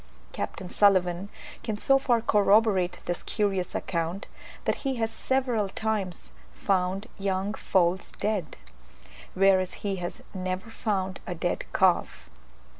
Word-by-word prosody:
Capt. - - -4
Sulivan 185 -2 +3 0.3
can 215 -2 -3
so 270 +5 +4
far 240 -3 +2
corroborate 205 -3 +3
this 175 - -2
curious 195 -4 -1
account, 170 +2 -2 0.4
that - - +1
he 270 -2 -2
has 225 -2 -1
several 245 -5 0
times 205 -5 -3 0.2
found 190 +1 0
young 195 +1 -1
foals 185 -3 +1
dead, 205 -5 -2 0.8
whereas 190 -1 +4
he 195 -1 0
has 175 -1 -5
never 185 +3 -3
found 190 -5 -2
a 180 - -3
dead 175 +1 -2
calf. 175 - +1
195 Hz, 120 wpm, -27 LUFS, 185-215 Hz, 0.8 s, so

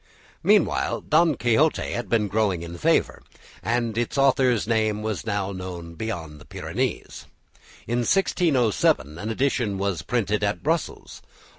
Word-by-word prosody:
Meanwhile - - +2
"Don 160 -1 +3
Quixote" 125 +7 +1
had 120 -5 -4
been 110 -3 +2
growing 100 -4 0
in 85 0 -7
favour, - - +1 0.4
and 115 -1 -1
its 120 +3 -2
author's 130 -5 +3
name 110 -2 0
was 110 -5 -3
now 100 -1 -1
known 90 -3 -7
beyond 80 -6 -6
the - - -14
Pyrenees. - - -4 0.6
In 120 +1 -1
1607 120 - +1
an 105 - -4
edition 120 -4 0
was 100 -4 -1
printed 105 -4 -1
at 100 0 -1
Brussels. 160 +2 -2
110 Hz, 135 wpm, -24 LUFS, 95-125 Hz, 0.6 s, Don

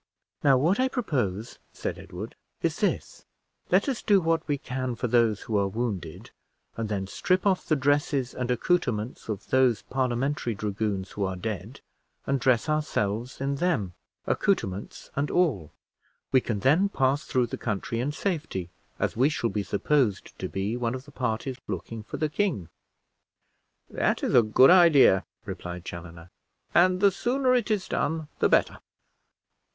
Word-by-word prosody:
"Now, 135 -2 +6
what 170 - +2
I 260 - +3
propose," 125 - -2
said - - -4
Edward, - - -8 0.3
"is - - 0
this: - - -1 0.5
let 185 +7 +3
us 265 -5 -1
do 200 -2 +4
what 165 -2 +1
we 145 -2 0
can 130 -2 -3
for 125 - -3
those 115 -3 +2
who 110 - -4
are 100 - +1
wounded, 105 -3 -4 0.4
and 115 -2 -3
then 100 -2 -2
strip 185 - 0
off 190 -2 +1
the 155 - +3
dresses 140 -2 +1
and 125 -1 -3
accouterments 125 - -1
of 105 -2 -4
those 130 -5 +3
Parliamentary 130 -1 -1
dragoons 100 -1 -2
who 100 - -3
are 95 -1 -1
dead, 110 +5 -5 0.4
and 140 0 0
dress 125 -1 +2
ourselves 125 -6 -1
in 140 +1 -1
them, 135 - 0 0.3
accouterments 100 - -1
and 140 +1 0
all. 130 - +1 0.6
We 130 - +5
can 105 -5 -3
then 165 - +4
pass 135 -4 +1
through 125 -1 +1
the 115 - -6
country 115 +2 -2
in 135 +5 -1
safety, 150 - -3 0.3
as - - -1
we 130 +5 +4
shall 135 -7 -1
be 105 - -1
supposed 105 +2 0
to 95 - -3
be 100 +4 -2
one 120 0 -1
of 130 +1 -8
the 145 - -14
parties 125 0 -2
looking 105 +3 -5
for 105 - -7
the 155 - 0
king." 150 - -1 1.2
"That - - 0
is - - 0
a 120 - +8
good 115 +7 +6
idea," 155 - +6 0.2
replied 90 -2 -6
Chaloner, 85 0 -9 0.4
"and 185 +1 +4
the 200 -1 +6
sooner 255 +6 +1
it 245 -3 +1
is 210 -3 0
done 160 -1 -1
the - - +3
better." - - +2
125 Hz, 165 wpm, -27 LUFS, 105-155 Hz, 1.2 s, a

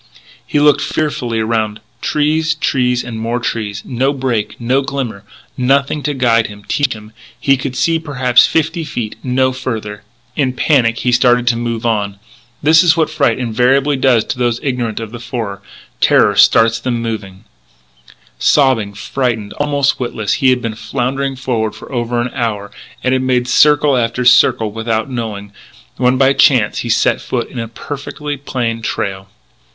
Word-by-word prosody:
He 145 - +1
looked 145 0 +4
fearfully 140 -7 -2
around: 110 -1 -1 0.2
trees, 155 +2 +1
trees, 125 -4 0
and 115 -2 -6
more 115 +2 -2
trees. 105 -4 -3
No 130 +3 0
break, 120 -6 -2
no 125 +3 +1
glimmer, 130 -7 -4 0.3
nothing 140 +3 +1
to 145 0 -2
guide 115 -3 +2
him, 105 0 -12
teach 145 -3 0
him. 105 -1 -12 0.3
He 135 - +3
could 130 0 -5
see, 165 +3 +1
perhaps, 130 -6 +3
fifty 160 +1 0
feet; 120 -8 -5
no 130 0 +1
further. 110 -5 -5 0.3
In 135 -4 0
panic 125 -4 +2
he 125 - +1
started 120 0 +3
to 120 - +1
move 115 -1 -3
on. 105 -3 -1 0.5
That 160 +2 +6
is 170 -2 +3
what 155 -1 +1
fright 140 -7 +1
invariably 130 +4 +1
does 130 -4 +3
to - - -5
those 120 -1 0
ignorant 120 -5 -2
of 115 -2 -6
the 120 - -8
forest. 115 -5 -5 0.4
Terror - - +4
starts 115 0 +5
them 120 0 -2
moving. 105 -5 -5 1.0
Sobbing, 120 -8 +2
frightened 110 -2 -2
almost 145 -1 +1
witless, 110 -4 -2
he 135 - +5
had 125 -1 +1
been 115 -1 -2
floundering 135 +4 -2
forward 120 -5 -2
for - - -12
over 120 -1 -1
an 120 +1 -2
hour, 105 -5 -3 0.3
and 130 - +1
had 130 - +1
made 125 -1 0
circle 150 +2 +4
after 120 0 -1
circle 115 -3 +4
without 115 +2 -2
knowing, 105 -4 -5 0.4
when, 125 0 +2
by 135 +1 +4
chance, 125 -7 +3
he - - -4
set - - +2
foot - - -3
in 125 - -6
a 115 - -3
perfectly 145 +4 -6
plain 120 -4 -3
trail. 95 -3 -3
125 Hz, 165 wpm, -16 LUFS, 115-135 Hz, 1.0 s, That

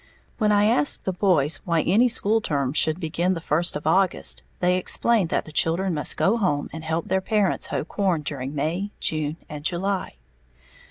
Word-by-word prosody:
When 210 -2 +2
I 205 0 +4
asked 150 -10 +2
the 190 - -1
boys 175 -4 +2
why 170 -2 +1
any 230 +7 +3
school 225 -1 +1
term 140 -7 -1
should 155 +1 +2
begin 175 +2 -1
the - - -4
first 165 +2 +1
of 150 - -5
August, 185 +3 +1 0.2
they 180 0 +2
explained 200 0 +1
that - - -1
the 155 - -10
children 170 +4 +1
must 150 -2 0
go 215 +5 +2
home 165 -10 -1
and 160 0 -7
help 160 +1 -2
their 190 +1 0
parents 205 -1 0
hoe - - -3
corn 185 -6 -1
during 140 -1 -5
May, 170 +8 -2
June 155 0 -1
and 150 -1 -8
July. 185 - -2
175 Hz, 185 wpm, -23 LUFS, 155-195 Hz, 0.2 s, I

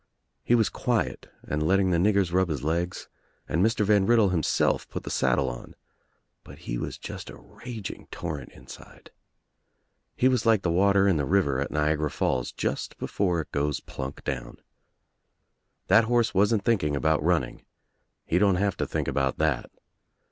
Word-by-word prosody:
He 120 - +3
was 110 -4 +3
quiet - - -2
and 75 +1 -3
letting 95 +4 +2
the 85 - +2
niggers 100 -2 +2
rub 95 0 +2
his 70 -4 -3
legs 85 +4 -2 0.4
and 85 - +1
Mr. 110 -1 +2
Van 100 -1 +3
Riddle 115 -4 +4
himself 85 -5 0
put - - -6
the - - -6
saddle 65 - +1
on, - - -7 0.7
but - - -13
he - - -3
was - - -5
just - - -8
a - - -10
raging 115 -6 -9
torrent 75 -6 -6
inside. 65 - -14 1.0
He 130 - +3
was 125 -3 +2
like 110 -4 +3
the 85 - +1
water 100 +2 +3
in 95 -5 +3
the 75 - 0
river 85 -9 +2
at 70 - -2
Niagara 75 0 0
Falls 65 -2 -1
just - - -3
before 90 -4 -1
its - - -12
goes 70 -1 -1
plunk 65 +1 -7
down. 65 -3 -5 1.3
That 115 - +5
horse 120 0 +1
wasn't 100 +2 +2
thinking 85 -11 +1
about 80 +2 +1
running. 80 -6 0 0.6
He 85 - +1
don't 100 -2 +4
have 100 0 0
to - - -2
think - - -2
about 70 -2 0
that. 80 -4 0
90 Hz, 170 wpm, -26 LUFS, 75-100 Hz, 1.3 s, That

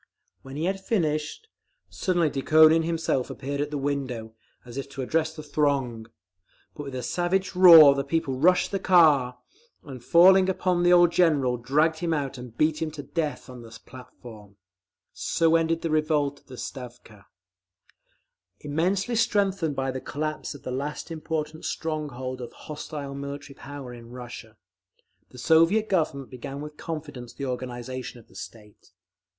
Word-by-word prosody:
When 135 0 -10
he 155 +3 -2
had 190 +1 -2
finished, 160 - -2 0.4
suddenly 175 -5 0
Dukhonin 155 +3 +5
himself 165 -6 -1
appeared 140 +1 -4
at 145 - -2
the 150 - -4
window, 130 -5 -3 0.3
as 120 -1 -11
if 140 0 -5
to 135 -1 -5
address 160 +3 -1
the 155 - -8
throng. 140 -6 -1 0.7
But 145 - -8
with 135 -2 -7
a 125 - -4
savage 185 +6 -1
roar 165 -6 +10
the 140 0 -2
people 165 -4 -1
rushed 180 +5 +3
the 195 - -1
car, 150 -10 +4 0.5
and 130 -4 -10
falling 185 +5 +6
upon 180 -1 0
the 175 0 +4
old 175 -1 +6
General, 155 -8 +2
dragged 150 +7 +1
him 170 -2 0
out 135 -3 -4
and 120 -2 -11
beat 155 0 +1
him 160 - -1
to 145 -2 -7
death 150 -3 -3
on 125 -2 -10
the 115 -1 -12
platform…. 110 -5 -13 0.6
So 165 0 +1
ended 165 0 +1
the 165 - -1
revolt 150 -2 0
of - - -34
the 130 -2 -11
Stavka…. 120 -6 -9 1.3
Immensely 180 +10 -1
strengthened 200 -8 +1
by 135 0 -1
the 130 0 -5
collapse 155 +1 -4
of 140 - -13
the 125 - -5
last 145 +5 -4
important 155 -1 -4
stronghold 135 -5 -4
of 120 - -7
hostile 150 -2 -7
military 140 +1 -7
power 140 -3 -9
in 115 -1 -12
Russia, 120 -3 -10 0.7
the 125 - -15
Soviet 165 - +3
Government 155 -7 -1
began 135 +2 -7
with 150 +1 -8
confidence 145 -8 -7
the 140 - -6
organisation 125 0 -6
of 115 - -20
the - - -21
state. 105 -4 -12
145 Hz, 160 wpm, -26 LUFS, 130-165 Hz, 1.3 s, roar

